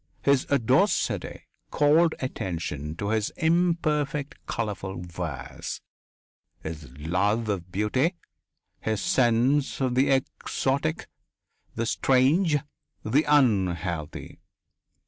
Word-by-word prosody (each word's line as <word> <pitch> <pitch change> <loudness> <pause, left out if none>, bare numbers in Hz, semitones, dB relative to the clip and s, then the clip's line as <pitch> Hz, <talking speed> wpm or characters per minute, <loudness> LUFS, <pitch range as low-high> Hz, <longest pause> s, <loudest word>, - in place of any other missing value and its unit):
His 140 -2 +3
audacity 140 -6 +1 0.3
called 155 +3 +4
attention 80 - -4
to 100 +3 -3
his 110 -1 +1
imperfect, 160 -4 0
colourful 95 -5 -4
verse, 85 -7 -6 0.8
his 80 -3 -7
love 100 +9 0
of 90 -3 -3
beauty, 130 - +1 0.6
his 110 -1 -1
sense 130 +5 +2
of 130 -2 0
the 130 +2 +3
exotic, 135 +3 -1 0.7
the 115 - -1
strange, 145 - +3 0.5
the 135 +8 +2
unhealthy. 90 - +1
115 Hz, 90 wpm, -26 LUFS, 90-140 Hz, 0.8 s, called